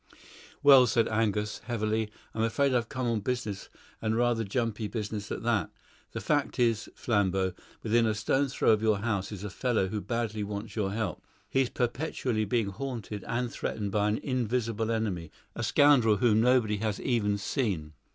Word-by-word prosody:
"Well," 135 Hz, -3 st, +8 dB
said 115 Hz, -1 st, +2 dB
Angus 110 Hz, -1 st, 0 dB
heavily. 110 Hz, -2 st, -1 dB, 0.2 s
"I'm 110 Hz, -, -2 dB
afraid 130 Hz, +5 st, +2 dB
I've 120 Hz, -2 st, 0 dB
come 130 Hz, -1 st, -3 dB
on 115 Hz, -2 st, +1 dB
business, 110 Hz, -3 st, -3 dB, 0.3 s
and 110 Hz, 0 st, 0 dB
rather 120 Hz, -1 st, +2 dB
jumpy 110 Hz, 0 st, -2 dB
business 105 Hz, -2 st, -4 dB
at -, -, -4 dB
that. -, -, +1 dB, 0.4 s
The -, -, -3 dB
fact 145 Hz, -2 st, 0 dB
is, 115 Hz, -4 st, +1 dB
Flambeau, 95 Hz, -4 st, +1 dB, 0.3 s
within 115 Hz, +1 st, +3 dB
a 110 Hz, -, +1 dB
stone's 135 Hz, +6 st, 0 dB
throw -, -, +4 dB
of 110 Hz, -1 st, +3 dB
your 110 Hz, -2 st, +3 dB
house 105 Hz, -4 st, -1 dB
is 100 Hz, -2 st, -7 dB
a 105 Hz, -, -5 dB
fellow 110 Hz, -5 st, 0 dB
who 105 Hz, +1 st, -3 dB
badly 115 Hz, -3 st, -2 dB
wants 100 Hz, +1 st, -5 dB
your 100 Hz, -3 st, 0 dB
help; 110 Hz, +1 st, -3 dB, 0.2 s
he's 130 Hz, +2 st, +1 dB
perpetually 125 Hz, -3 st, -1 dB
being 110 Hz, 0 st, 0 dB
haunted 110 Hz, -2 st, -5 dB
and 120 Hz, 0 st, -1 dB
threatened 105 Hz, -2 st, -3 dB
by 105 Hz, +1 st, +2 dB
an 105 Hz, -, +1 dB
invisible 115 Hz, -3 st, -1 dB
enemy 105 Hz, -8 st, -2 dB, 0.3 s
a -, -, -4 dB
scoundrel 135 Hz, -7 st, +5 dB
whom 110 Hz, 0 st, +3 dB
nobody 120 Hz, -4 st, +3 dB
has 105 Hz, -1 st, -2 dB
even 105 Hz, -5 st, +1 dB
seen." 95 Hz, -, -2 dB
110 Hz, 170 wpm, -29 LUFS, 105-120 Hz, 0.4 s, Well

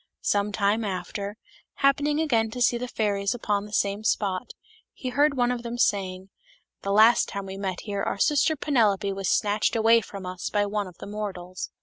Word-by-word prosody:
Some 205 Hz, 0 st, +1 dB
time 205 Hz, +2 st, +1 dB
after, 200 Hz, +2 st, -4 dB, 0.4 s
happening 290 Hz, +2 st, +2 dB
again 235 Hz, -8 st, +2 dB
to 245 Hz, +3 st, -6 dB
see 240 Hz, 0 st, +2 dB
the 250 Hz, -, -3 dB
fairies 205 Hz, -2 st, -1 dB
upon 205 Hz, -3 st, -1 dB
the -, -, -14 dB
same 200 Hz, 0 st, 0 dB
spot, 200 Hz, +1 st, -1 dB, 0.4 s
he 255 Hz, -, -5 dB
heard 285 Hz, +2 st, +2 dB
one 245 Hz, 0 st, +2 dB
of 245 Hz, -1 st, -3 dB
them 235 Hz, 0 st, -5 dB
saying, 190 Hz, -4 st, 0 dB, 0.2 s
" -, -, -41 dB
The 200 Hz, -, -2 dB
last 220 Hz, +4 st, +5 dB
time 200 Hz, -1 st, -5 dB
we 190 Hz, 0 st, -7 dB
met 190 Hz, -2 st, -4 dB
here 200 Hz, -2 st, -3 dB
our -, -, -2 dB
sister 295 Hz, +8 st, +3 dB
Penelope 215 Hz, -9 st, +1 dB
was 195 Hz, -1 st, -2 dB
snatched 210 Hz, +2 st, +1 dB
away 230 Hz, +1 st, +5 dB
from 195 Hz, -2 st, -9 dB
us 180 Hz, 0 st, -4 dB
by 205 Hz, 0 st, +1 dB
one 205 Hz, -1 st, -2 dB
of 180 Hz, -, -13 dB
the -, -, -9 dB
mortals." 190 Hz, -3 st, -5 dB
205 Hz, 200 wpm, -26 LUFS, 195-235 Hz, 0.4 s, last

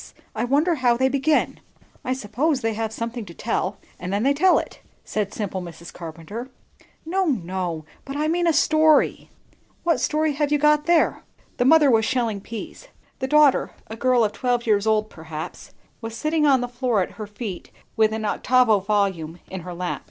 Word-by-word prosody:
I -, -, -1 dB
wonder 295 Hz, +7 st, +2 dB
how 250 Hz, -5 st, +2 dB
they 260 Hz, +1 st, +2 dB
begin." 280 Hz, +3 st, +1 dB, 0.4 s
"I 255 Hz, -, -1 dB
suppose 260 Hz, +5 st, -1 dB
they 225 Hz, -1 st, 0 dB
have 220 Hz, 0 st, -3 dB
something 230 Hz, +1 st, -4 dB
to 170 Hz, -, -12 dB
tell; 210 Hz, -3 st, -2 dB, 0.2 s
and 180 Hz, +1 st, -5 dB
then 200 Hz, +2 st, 0 dB
they 275 Hz, +2 st, +3 dB
tell 360 Hz, +6 st, +4 dB
it," -, -, -5 dB, 0.2 s
said 210 Hz, -2 st, -2 dB
simple 195 Hz, -3 st, -4 dB
Mrs. 170 Hz, -1 st, -10 dB
Carpenter. 175 Hz, +9 st, -8 dB, 0.6 s
"No, 375 Hz, +4 st, 0 dB
no, 180 Hz, -, -2 dB, 0.2 s
but 275 Hz, +1 st, -6 dB
I 305 Hz, +1 st, 0 dB
mean 345 Hz, +2 st, +1 dB
a -, -, +5 dB, 0.2 s
story." 310 Hz, -1 st, +3 dB, 0.5 s
"What 335 Hz, -1 st, +2 dB
story 310 Hz, 0 st, +1 dB
have 290 Hz, 0 st, -1 dB
you 295 Hz, -, +4 dB
got 300 Hz, +1 st, +3 dB
there?" 340 Hz, -1 st, +3 dB, 0.4 s
The 245 Hz, -, +1 dB
mother 300 Hz, -1 st, +6 dB
was 225 Hz, -1 st, +4 dB
shelling 230 Hz, -4 st, -1 dB
peas; 230 Hz, -, -8 dB, 0.3 s
the 260 Hz, -, -2 dB
daughter, 300 Hz, -1 st, +4 dB, 0.2 s
a -, -, -4 dB
girl 245 Hz, 0 st, +3 dB
of 210 Hz, -, +1 dB
twelve 245 Hz, -1 st, -1 dB
years 210 Hz, -1 st, +2 dB
old 215 Hz, -1 st, +2 dB
perhaps, 160 Hz, -1 st, -8 dB, 0.3 s
was 225 Hz, 0 st, -6 dB
sitting 305 Hz, -1 st, +1 dB
on 265 Hz, -3 st, +4 dB
the 245 Hz, -, -2 dB
floor 240 Hz, -4 st, 0 dB
at -, -, -7 dB
her 210 Hz, -, -5 dB
feet, 205 Hz, -3 st, -7 dB, 0.3 s
with 220 Hz, -1 st, +3 dB
an 220 Hz, 0 st, -3 dB
octavo 235 Hz, 0 st, +3 dB
volume 190 Hz, -5 st, -1 dB
in 190 Hz, -, -4 dB
her 180 Hz, +1 st, -7 dB
lap. 180 Hz, 0 st, -3 dB
235 Hz, 190 wpm, -23 LUFS, 205-285 Hz, 0.6 s, mother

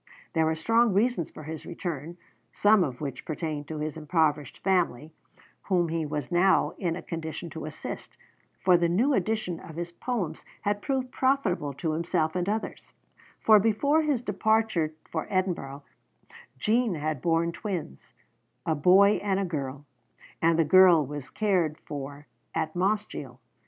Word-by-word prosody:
There 160 Hz, -1 st, +2 dB
were 160 Hz, -, +1 dB
strong 225 Hz, +6 st, +3 dB
reasons 210 Hz, -4 st, +1 dB
for 155 Hz, -, -11 dB
his 155 Hz, +1 st, -6 dB
return, 170 Hz, -1 st, -5 dB, 0.3 s
some 205 Hz, -2 st, +4 dB
of 130 Hz, -4 st, -4 dB
which 135 Hz, -4 st, -5 dB
pertained 155 Hz, -2 st, -4 dB
to 160 Hz, -, -5 dB
his 150 Hz, 0 st, -3 dB
impoverished 155 Hz, -2 st, 0 dB
family, 165 Hz, -6 st, +1 dB, 0.5 s
whom 175 Hz, -3 st, +1 dB
he 165 Hz, -1 st, -1 dB
was 145 Hz, -3 st, -4 dB
now 185 Hz, +2 st, +4 dB
in 175 Hz, -4 st, -1 dB
a -, -, -7 dB
condition 165 Hz, 0 st, -5 dB
to 160 Hz, -, -6 dB
assist, 155 Hz, -, -7 dB, 0.4 s
for 180 Hz, -1 st, +5 dB
the 170 Hz, 0 st, +1 dB
new 235 Hz, +12 st, +2 dB
edition 205 Hz, -5 st, -1 dB
of 160 Hz, -, -11 dB
his 170 Hz, +1 st, -4 dB
Poems 180 Hz, -5 st, -3 dB, 0.2 s
had 205 Hz, 0 st, 0 dB
proved 260 Hz, 0 st, -2 dB
profitable 245 Hz, -, +1 dB
to 160 Hz, +4 st, -2 dB
himself, 160 Hz, 0 st, 0 dB
and 180 Hz, +1 st, 0 dB
others 220 Hz, +1 st, -4 dB, 0.5 s
for 215 Hz, -1 st, +7 dB
before 225 Hz, +9 st, +2 dB
his 290 Hz, -6 st, 0 dB
departure 210 Hz, -6 st, +1 dB, 0.2 s
for 160 Hz, -, -3 dB
Edinburgh, 170 Hz, -8 st, -2 dB, 0.7 s
Jean 225 Hz, -, +1 dB
had 155 Hz, -3 st, -2 dB
borne 170 Hz, 0 st, +1 dB
twins, 170 Hz, -, -6 dB, 0.5 s
a 165 Hz, -, +2 dB
boy 190 Hz, +7 st, +5 dB
and 195 Hz, -1 st, 0 dB
a 200 Hz, -, 0 dB
girl; 140 Hz, -4 st, -4 dB, 0.6 s
and 165 Hz, 0 st, +4 dB
the 165 Hz, -, +3 dB
girl 175 Hz, -1 st, +7 dB
was 145 Hz, 0 st, -6 dB
being -, -, -22 dB
cared 180 Hz, -8 st, +1 dB
for 145 Hz, 0 st, -7 dB, 0.3 s
at 155 Hz, -1 st, -1 dB
Mossgiel. 185 Hz, -, -2 dB
170 Hz, 155 wpm, -27 LUFS, 155-200 Hz, 0.7 s, for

